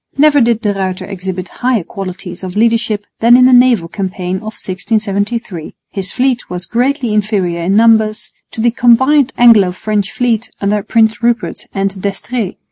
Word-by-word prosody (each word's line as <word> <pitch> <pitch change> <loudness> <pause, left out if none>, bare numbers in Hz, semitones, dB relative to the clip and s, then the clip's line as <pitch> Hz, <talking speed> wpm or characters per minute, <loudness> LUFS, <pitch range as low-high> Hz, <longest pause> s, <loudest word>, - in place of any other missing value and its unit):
Never 295 -1 +4
did 230 -1 +2
De 205 -2 0
Ruyter 190 -2 -3
exhibit 190 -1 -5
higher 245 -6 +1
qualities 185 0 -7
of 185 0 -6
leadership 225 -2 +1
than 235 +2 +6
in 250 - +5
the 255 - +5
naval 245 -8 +4
campaign 185 -1 -4
of 215 +3 -7
1673. 200 -1 -3 0.2
His 195 -1 -5
fleet 255 -1 -1
was 180 0 -5
greatly 245 - -1
inferior 195 -5 -1
in 185 +4 0
numbers 220 -3 +2 0.2
to 225 - -4
the 235 +1 +3
combined 260 +3 +3
Anglo 225 -6 +5
French 205 +2 -2
fleet 235 -2 -1
under 205 +1 0
Prince 220 +1 +1
Rupert 240 0 -1
and 195 -1 -3
D'Estrées. 205 +1 -3
215 Hz, 160 wpm, -14 LUFS, 190-235 Hz, 0.2 s, than